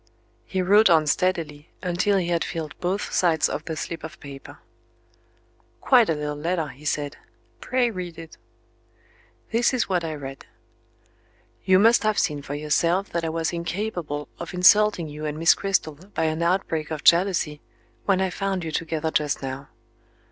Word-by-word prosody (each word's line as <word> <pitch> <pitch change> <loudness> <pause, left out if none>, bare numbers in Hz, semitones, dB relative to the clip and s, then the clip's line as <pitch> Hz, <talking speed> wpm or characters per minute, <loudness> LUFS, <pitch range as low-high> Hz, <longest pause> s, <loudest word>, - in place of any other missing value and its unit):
He 185 -1 -1
wrote 205 +3 +5
on 160 -2 +5
steadily, 155 -3 -1
until 180 +3 +1
he 175 -2 -1
had 170 -1 +1
filled 160 -3 -5
both 185 +3 -2
sides 165 -3 +3
of 150 - -4
the 160 - -4
slip 165 +1 -5
of 160 - -9
paper. 140 0 -11 1.2
"Quite 240 - +4
a 160 - +2
little 150 0 -3
letter," 165 +1 -2
he 145 +3 -14
said. 145 -1 -2 0.4
"Pray 250 -2 0
read 180 -4 -6
it." 165 -1 -10 1.2
This 240 +3 +2
is 250 - 0
what 180 -3 0
I 160 -1 -3
read: 135 -2 -9 1.2
"You 185 0 +5
must 225 +4 +5
have 215 -1 +1
seen 150 -6 0
for 140 +1 -6
yourself 165 +6 +1
that 170 -1 -2
I 165 - -1
was 165 +1 -2
incapable 170 -4 -3
of 170 +2 -6
insulting 195 -1 +5
you 150 +1 -6
and 150 0 -4
Miss 165 +1 +5
Cristel 195 -5 -1 0.2
by - - 0
an 160 +1 0
outbreak 170 -3 0
of 155 -2 -5
jealousy, 170 -4 +3 0.4
when 190 -2 +2
I 190 -1 0
found 195 -1 -2
you 160 - -4
together 160 0 -2
just 150 -3 0
now. 135 +1 -6
165 Hz, 170 wpm, -24 LUFS, 150-185 Hz, 1.2 s, wrote